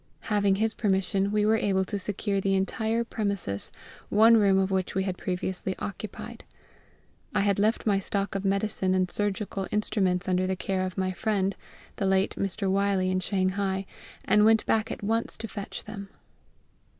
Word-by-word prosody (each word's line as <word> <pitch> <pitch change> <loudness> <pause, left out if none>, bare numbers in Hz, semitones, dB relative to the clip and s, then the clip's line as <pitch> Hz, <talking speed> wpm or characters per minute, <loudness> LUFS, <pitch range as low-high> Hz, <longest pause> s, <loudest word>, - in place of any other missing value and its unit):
Having 200 -2 +3
his 220 +2 +1
permission, 195 -1 +1
we 210 0 +2
were 220 +1 +4
able 190 -3 +1
to 205 +1 -3
secure 200 0 -2
the 195 0 +1
entire 220 +4 0
premises, 200 - -3 0.4
one 225 +3 +6
room 200 -3 +4
of 195 0 +1
which 190 -1 -1
we 190 - +1
had 190 -2 -2
previously 185 +1 -3
occupied. 205 +2 -7 0.9
I - - +3
had 200 -1 +2
left 215 +3 +1
my 200 -3 +3
stock 200 +1 -2
of 195 0 -2
medicine 195 -1 0
and 185 -1 +1
surgical 205 -1 -2
instruments 195 -3 +1
under 185 0 +1
the 190 - 0
care 185 0 -1
of 185 - -8
my 185 -1 0
friend, 195 0 0 0.4
the 195 - 0
late 190 +1 +2
Mr. 195 +1 -2
Wylie, 195 -1 +2
in 185 - +1
Shanghai, 190 +1 0 0.4
and 210 +1 +4
went 220 0 +5
back 225 +1 +1
at - - -6
once 225 +3 -1
to 225 - -5
fetch 205 -2 -6
them. 200 -2 -8
195 Hz, 175 wpm, -27 LUFS, 190-210 Hz, 0.9 s, one